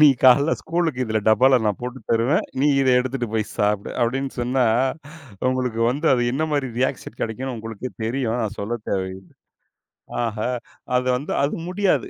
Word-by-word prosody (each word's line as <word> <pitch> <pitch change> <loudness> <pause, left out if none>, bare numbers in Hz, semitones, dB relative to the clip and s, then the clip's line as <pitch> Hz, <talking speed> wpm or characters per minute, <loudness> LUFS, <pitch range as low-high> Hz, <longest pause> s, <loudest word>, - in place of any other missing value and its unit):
"நீ 150 - +9 0.2
காலையில 140 +5 +6
ஸ்கூலுக்கு 160 -7 0
இதுல 110 -1 0
டப்பால 130 +3 +5
நான் 105 - 0
போட்டு 125 +1 -5
தருவேன், 115 +6 +2 0.2
நீ 150 - +4
இத 135 - +2
எடுத்துட்டு 125 -2 -3
போய் 110 -1 0
சாப்பிடு," 105 -1 0
அப்படின்னு 135 +3 -1
சொன்னா, 125 +1 +1 0.9
உங்களுக்கு 125 -3 -1
வந்து 150 +5 0
அது 120 -1 +1
என்ன 155 +4 0
மாரி 140 -4 0
ரியாக்ஷன் 130 -3 -2
கிடைக்கும்னு 125 +3 -3
உங்களுக்கே 115 +2 -6 0.2
தெரியும், 120 -1 -1
நான் 110 0 -4
சொல்லத் 110 +2 -4
தேவையி 95 -1 -2 1.0
ஆஹ! 110 -2 -3 0.6
அது 125 0 -1
வந்து 145 - -6
அது 140 - 0
முடியாது. 195 +1 +1
125 Hz, 160 wpm, -22 LUFS, 110-135 Hz, 1.0 s, நீ